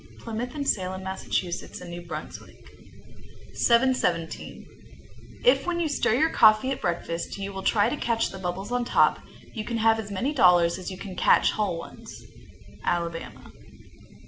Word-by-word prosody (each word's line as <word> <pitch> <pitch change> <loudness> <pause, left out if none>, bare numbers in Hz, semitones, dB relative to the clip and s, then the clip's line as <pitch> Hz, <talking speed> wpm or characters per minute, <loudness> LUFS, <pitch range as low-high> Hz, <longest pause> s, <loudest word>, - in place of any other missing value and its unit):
Plymouth 235 +3 -5
and 285 -2 -3
Salem, 190 -1 -1
Mass., 190 0 -6 0.2
and 175 0 -7
New 175 0 -6
Brunswick. 175 - -9 0.9
717. 235 -9 +1 0.8
If - - +4
when 345 -1 0
you 335 - +1
stir 285 -6 +1
your 315 +5 +2
coffee 220 +4 +5
at 270 - -4
breakfast 170 0 -3
you 200 0 -5
will 195 - -5
try 205 +1 +3
to 250 - -1
catch 230 -3 0
the 190 - -8
bubbles 190 +4 -4
on 245 0 0
top, - - +3 0.3
you 220 - -4
can 230 +2 -3
have 225 0 +3
as 210 -2 -6
many 240 +9 -2
dollars 180 - +4
as 185 - -6
you 185 - -7
can 190 -1 -8
catch - - +4
whole 205 -5 -1
ones. 165 - -10 0.6
_Alabama. 165 -9 -3
200 Hz, 160 wpm, -26 LUFS, 180-240 Hz, 0.9 s, coffee